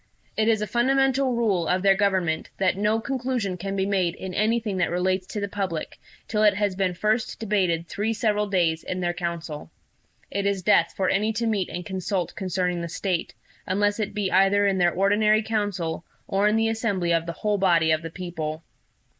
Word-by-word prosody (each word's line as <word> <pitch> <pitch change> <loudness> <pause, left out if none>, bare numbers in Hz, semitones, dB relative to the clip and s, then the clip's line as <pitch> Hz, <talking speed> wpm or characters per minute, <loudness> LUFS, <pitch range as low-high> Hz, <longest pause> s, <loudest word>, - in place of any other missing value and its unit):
It 220 0 +1
is 220 -2 +2
a - - 0
fundamental 265 +3 +2
rule 200 -8 +1
of 185 +1 +1
their 195 -1 +6
government, 190 -5 0
that 190 -1 +2
no 210 +3 +1
conclusion 250 -6 -2
can 195 +2 -4
be 190 -1 0
made 185 -4 0
in 190 0 -7
anything 215 0 0
that 180 - +1
relates 185 +1 0
to 210 - -4
the 200 - -2
public 190 -5 -4 0.3
till 210 - 0
it 210 -2 +5
has 205 -1 0
been 185 -2 0
first 215 +5 0
debated 185 -6 0
three 210 +5 -2
several 210 -1 0
days 170 -4 +1
in 185 - -4
their 175 -1 0
council. 170 - -5 0.6
It 200 +1 -1
is 195 -2 -1
death 170 0 +4
for 190 - +1
any 210 +4 +1
to 230 +2 -1
meet 210 -5 0
and 180 +1 -6
consult 190 -1 -2
concerning 180 -2 -1
the 170 - -4
State, 180 0 -2 0.3
unless 205 +3 +1
it 210 - -3
be 205 -3 -1
either 195 +2 +4
in 195 -1 +1
their 175 -1 +4
ordinary 210 +3 +3
council, 205 -7 -2 0.2
or 195 +2 +2
in 210 - +2
the 225 0 +2
assembly 205 -6 -1
of 165 0 0
the 170 - -3
whole 210 -1 +2
body 170 -4 +3
of 155 0 +2
the 165 - -6
people. 165 -2 -5
195 Hz, 200 wpm, -25 LUFS, 180-210 Hz, 0.6 s, their